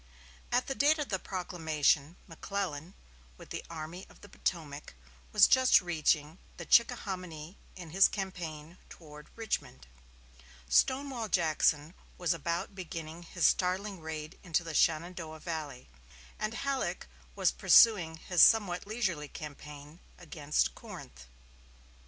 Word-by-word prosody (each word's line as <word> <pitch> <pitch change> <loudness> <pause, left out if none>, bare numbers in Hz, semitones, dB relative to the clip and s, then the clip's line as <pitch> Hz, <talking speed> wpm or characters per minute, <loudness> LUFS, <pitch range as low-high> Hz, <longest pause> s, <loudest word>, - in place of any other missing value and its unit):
At 245 +1 +2
the 270 - -3
date 290 +4 +3
of 295 -2 -3
the 190 -3 -1
proclamation 160 -5 0
McClellan, 175 -2 -5 0.4
with - - -14
the - - -5
Army 165 +3 -7
of - - -19
the 205 - -13
Potomac, 150 - -4 0.4
was - - +7
just 260 -1 +6
reaching 160 -2 0 0.2
the - - -7
Chickahominy 185 -8 0 0.2
in 175 -4 -10
his 195 +3 +6
campaign 170 -4 -6
toward 150 -2 -13
Richmond; 225 - -4 0.8
Stonewall 260 - +1
Jackson 160 -3 +1 0.2
was 175 -1 +1
about 170 +4 -3
beginning 165 -3 -7
his 175 0 -2
startling 190 +1 +1
raid 155 +1 -7
into 170 -2 -1
the 165 -1 -6
Shenandoah 160 0 0
valley; 155 -6 -6 0.5
and 215 +2 -3
Halleck 275 0 -2 0.3
was - - +2
pursuing 180 -9 +5
his 175 +1 +1
somewhat 200 -5 +5
leisurely 190 -9 -2
campaign 150 +1 -10 0.2
against 150 -3 -1
Corinth. 65 0 -11
170 Hz, 120 wpm, -31 LUFS, 155-195 Hz, 0.8 s, was